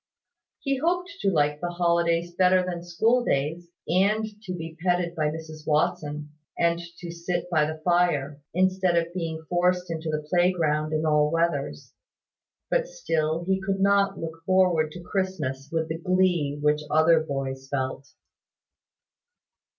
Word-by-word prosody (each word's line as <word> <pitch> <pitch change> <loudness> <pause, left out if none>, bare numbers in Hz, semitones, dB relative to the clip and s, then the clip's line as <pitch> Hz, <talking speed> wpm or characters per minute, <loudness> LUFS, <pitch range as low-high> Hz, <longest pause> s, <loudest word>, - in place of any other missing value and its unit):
He 275 -1 0
hoped 355 +5 0
to 195 - +2
like 150 -4 +1
the 175 - -1
holidays 170 0 +1
better 185 0 +4
than 175 -2 -4
school 225 +8 +2
days, 160 +1 -1 0.2
and 200 +6 +2 0.2
to 190 -4 -7
be 165 -1 -7
petted 175 -1 +1
by 155 -3 0
Mrs 155 0 -8
Watson, 150 -1 0 0.3
and 170 0 +2 0.2
to 175 -1 -7
sit 170 +1 -3
by 155 -3 +3
the 155 0 -4
fire, 155 -5 +1
instead 185 0 +2
of 170 0 0
being 165 -3 -4
forced 180 0 +1
into 160 -1 -3
the 150 -1 -3
playground 160 -3 +2
in 155 0 0
all 150 -1 +3
weathers; 170 +1 -1 0.8
but - - +2
still 165 - -1
he 190 +1 +1
could 195 0 -1
not 200 0 +3
look 165 0 -7
forward 180 -4 +3
to 175 - -9
Christmas 155 -9 -3
with 160 -1 0
the 160 0 -4
glee 175 -5 +1
which 150 0 +2
other 160 +2 +5
boys 135 -3 -4
felt. 135 0 -3
170 Hz, 150 wpm, -26 LUFS, 155-185 Hz, 0.8 s, other